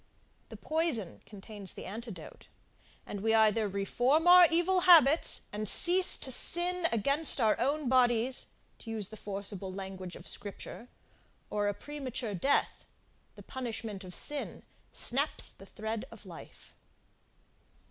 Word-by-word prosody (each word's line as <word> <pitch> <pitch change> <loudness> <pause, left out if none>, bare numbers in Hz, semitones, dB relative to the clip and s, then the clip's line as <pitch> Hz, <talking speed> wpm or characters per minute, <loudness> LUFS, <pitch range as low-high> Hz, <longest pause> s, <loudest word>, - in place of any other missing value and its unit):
The - - -10
poison 310 - -1
contains 205 -1 -6
the - - -9
antidote; 210 -5 -9 0.6
and 200 - -7
we 225 +1 +2
either 220 0 +3
reform 245 - 0
our 355 0 +9
evil 350 +3 +2
habits, 330 -4 +5
and 210 -1 -2
cease 365 +1 +4
to 260 - -1
sin 350 +5 +1
against 280 +8 +3
our 220 -3 +3
own 280 +3 -1
bodies, 250 0 +2 0.3
to - - -11
use 215 -3 -4
the 220 - -9
forcible 200 -2 -5
language 190 -1 -7
of - - -11
scripture, 205 +3 -7 0.6
or 205 -1 -1
a 205 - -1
premature 255 -6 -5
death, 270 +10 0 0.5
the - - -13
punishment 225 -6 -6
of 180 -1 -6
sin, 295 -1 -3 0.3
snaps - - -1
the - - -16
thread 220 +2 -5
of - - -13
life. - - -13
230 Hz, 135 wpm, -30 LUFS, 205-295 Hz, 0.6 s, our